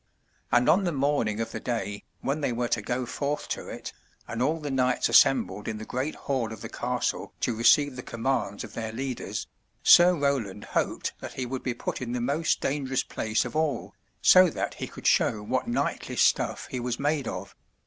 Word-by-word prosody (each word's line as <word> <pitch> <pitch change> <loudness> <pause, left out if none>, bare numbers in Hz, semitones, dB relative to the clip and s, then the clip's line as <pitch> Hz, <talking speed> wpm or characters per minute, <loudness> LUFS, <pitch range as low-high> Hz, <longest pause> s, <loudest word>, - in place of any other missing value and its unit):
And 120 0 +4
on 180 +6 +5
the 175 - 0
morning 135 -7 0
of 115 - -3
the - - -4
day 105 -5 -3 0.2
when 140 +3 -1
they 140 - 0
were 120 0 -1
to 110 - +1
go 125 +4 -2
forth 140 +4 -3
to - - -4
it, - - -7 0.3
and 115 0 -4
all 155 +5 +1
the 145 -2 -4
knights 125 -1 +2
assembled 105 -6 +4
in 110 - -3
the 110 - -7
great 130 +7 -3
hall 130 -5 -2
of 110 - -8
the - - -6
castle - - -2
to 120 - 0
receive 130 +4 +4
the 125 - -5
commands 115 -4 -2
of - - -10
their 110 -1 -4
leaders. 130 +2 -4 0.4
Sir 180 +1 +8
Roland 135 - -1
hoped - - -1
that - - -7
he 130 - -3
would 130 +1 -4
be 125 -2 -2
put - - -4
in 120 -1 -3
the 125 - -1
most 145 +7 0
dangerous 135 -2 0
place 110 0 -1
of - - -6
all, 155 -3 -1 0.3
so 185 -1 +8
that - - -3
he - - -5
could - - -12
show 105 -1 +3
what 125 +5 -1
knightly 120 - -2
stuff - - +2
he 130 - -2
was 120 0 -2
made 145 -2 0
of. - - -5
125 Hz, 205 wpm, -27 LUFS, 115-145 Hz, 0.4 s, Sir